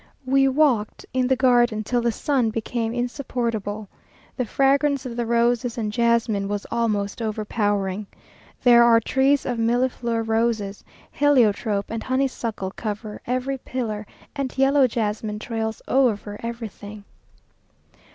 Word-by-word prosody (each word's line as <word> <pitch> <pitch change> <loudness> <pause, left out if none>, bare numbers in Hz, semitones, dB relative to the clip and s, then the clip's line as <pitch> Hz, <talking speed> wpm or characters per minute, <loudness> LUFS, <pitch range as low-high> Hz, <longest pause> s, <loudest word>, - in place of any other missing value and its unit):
We 270 +1 +4
walked 265 -6 +1
in 255 -1 +1
the 260 - +3
garden 240 -4 +3
till 240 +3 0
the 235 0 +1
sun 250 0 0
became 225 +1 -2
insupportable. 235 -4 -3 0.5
The 250 - -1
fragrance 275 +3 +2
of 240 -2 -5
the 240 -1 -2
roses 235 +1 +1
and 215 -2 -2
jasmine 230 -4 +1
was 205 0 -3
almost 210 -2 -1
overpowering. 205 -2 -1 0.6
There 240 -1 +7
are 230 -1 +6
trees 270 +4 +2
of 245 -2 -2
millefleur 235 0 0
roses; 220 -3 0 0.3
heliotrope 225 -7 +2
and 225 0 -3
honeysuckle 255 -7 -2
cover 210 0 -5
every 255 +2 -1
pillar, 220 -5 -4 0.3
and 270 -2 -4
yellow 270 0 +4
jasmine 215 -2 -2
trails 220 0 -4
over 215 -6 +1
everything.... 215 -3 -7
235 Hz, 125 wpm, -23 LUFS, 215-255 Hz, 0.6 s, There